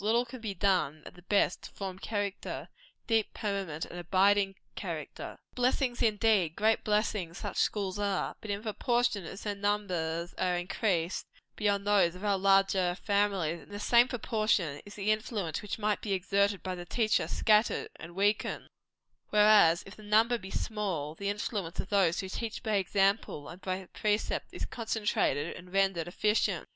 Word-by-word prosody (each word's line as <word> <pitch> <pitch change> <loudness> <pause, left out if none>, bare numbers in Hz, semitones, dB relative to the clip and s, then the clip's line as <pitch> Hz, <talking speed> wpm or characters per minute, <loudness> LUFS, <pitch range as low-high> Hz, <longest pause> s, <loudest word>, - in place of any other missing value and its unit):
Little 230 +3 +3
can 250 0 -10
be 210 -3 -4
done, 175 -5 +1
at - - -10
the 175 - -15
best, 195 0 +1
to - - -9
form 190 -2 -6
character 205 -2 -4 0.4
deep, 225 -2 +1
permanent, 195 -7 -3
and 175 - -8
abiding 195 +3 +3 0.2
character. - - -6 0.2
Blessings 250 0 +1
indeed 210 -6 +3
great 220 +2 +2
blessings 210 -5 0
such - - -5
schools 200 -2 0
are; 200 -2 -1
but 215 - -8
in 200 +1 -2
proportion 235 -2 0
as 195 +5 -8
their 205 - -1
numbers 185 -5 -1
are 180 -1 +1
increased 175 -1 -1 0.3
beyond 205 -1 0
those 195 -4 +3
of 185 +3 -7
our 200 -2 +2
larger 195 -2 +3
families, 195 -5 0
in - - -17
the 205 0 -6
same 240 +3 +5
proportion 215 - 0
is 205 - -10
the 205 +1 +1
influence 215 -7 -2
which 210 - -4
might 210 -1 0
be 205 - -2
exerted 200 +1 +1
by 185 - -3
the 175 -1 -6
teacher, 215 +4 +1
scattered 215 0 +2
and 170 +1 -10
weakened; 205 +2 0 0.6
whereas, 210 -5 +6
if 195 - -11
the - - -14
number 220 +3 +3
be 190 -2 -9
small, 190 -10 -2
the 200 +5 -3
influence 205 -4 -3
of - - -3
those 190 -4 +3
who 190 - -5
teach 220 +5 -5
by 215 -3 +1
example 195 -5 +1
and 180 +2 -10
by 185 0 -3
precept, 210 0 0
is - - -4
concentrated, 210 - -1
and 180 0 -12
rendered 190 -4 +1
efficient. 210 +4 +1
200 Hz, 170 wpm, -30 LUFS, 180-215 Hz, 0.6 s, whereas